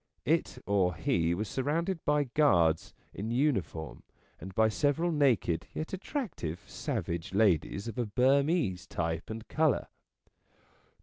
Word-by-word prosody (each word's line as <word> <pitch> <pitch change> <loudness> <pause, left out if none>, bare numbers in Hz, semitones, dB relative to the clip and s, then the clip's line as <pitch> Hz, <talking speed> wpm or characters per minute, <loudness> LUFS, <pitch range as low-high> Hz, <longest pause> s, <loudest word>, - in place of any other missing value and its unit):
It - - +1
or 95 -4 +2
he 85 0 +1
was 105 +4 -3
surrounded 165 - -1
by 150 0 +3
guards 90 - +2 0.2
in 105 +3 -4
uniform 115 - -1 0.4
and 95 +4 -8
by 110 0 +5
several 145 +9 +1
naked 115 - +2
yet 155 - -4
attractive 190 - -4
savage 85 +3 -4
ladies 100 0 +2
of 115 +2 -5
a 120 - 0
Burmese 135 - +2
type 80 -1 -3
and 110 +1 -6
colour. 155 -2 +1
110 Hz, 125 wpm, -30 LUFS, 90-145 Hz, 0.4 s, by